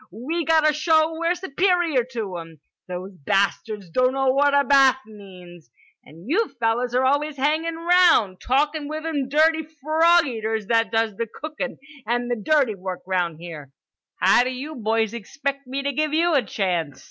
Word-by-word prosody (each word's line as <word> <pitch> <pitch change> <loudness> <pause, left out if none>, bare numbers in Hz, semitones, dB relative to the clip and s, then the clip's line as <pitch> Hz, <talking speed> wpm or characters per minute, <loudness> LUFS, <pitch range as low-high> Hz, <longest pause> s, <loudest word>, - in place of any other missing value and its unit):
We 295 - -4
gotta 315 -1 +3
show 315 +1 +2
we're 335 +2 -1
superior 350 -5 +1
to 205 -6 -4
'em. 165 -2 -12 0.3
Those 180 +2 -6
bastards 200 +1 -1
doughno 260 +4 +2
what 285 +1 +3
a 280 - +4
bath 270 -2 +5
means. 180 - -14 0.3
And 165 +6 -15
you 405 - +1
fellers 235 +2 0
are 255 +1 +2
always 290 +2 0
hangin' 310 +4 0
'round, 335 - +3
talkin' 295 +3 0
with 310 +1 -5
them 290 -5 -2
dirty 315 +3 +3
frog 315 +3 +2
eaters 220 -4 -3
that 230 -1 +2
does 225 -3 0
the 230 - -2
cookin' 300 +2 -6 0.3
and 240 +1 -1
the - - +1
dirty 260 +1 +1
work 185 -2 -6
'round 180 -4 -1
here. 160 -5 -9 0.5
How 245 - +4
d'you 255 +5 -5
boys 225 -3 -1
expect 275 +4 -5
me 270 +2 -4
to 280 - -1
give 305 +2 -1
you 340 +1 +2
a 280 - +4
chance? 175 - -3
260 Hz, 165 wpm, -23 LUFS, 210-310 Hz, 0.5 s, bath